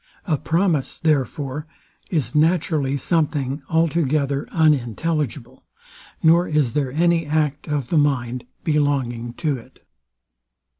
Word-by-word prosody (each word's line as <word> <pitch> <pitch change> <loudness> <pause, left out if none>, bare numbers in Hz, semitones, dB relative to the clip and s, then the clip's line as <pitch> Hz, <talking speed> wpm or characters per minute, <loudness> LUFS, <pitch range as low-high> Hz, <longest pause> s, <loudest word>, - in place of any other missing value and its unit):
A 165 -6 +1
promise, 165 -4 0
therefore, 145 -1 -1 0.4
is 155 -7 -1
naturally 155 -3 +2
something 145 -2 0
altogether 155 -4 +1
unintelligible, 150 -2 0 0.6
nor 170 +2 +5
is 150 -6 +1
there 140 -3 0
any 165 +2 +2
act 150 -1 0
of 145 -5 -2
the 165 - +3
mind 125 -4 0 0.2
belonging 135 -6 0
to 150 -1 -1
it. 115 - -17
150 Hz, 105 wpm, -22 LUFS, 135-160 Hz, 0.6 s, nor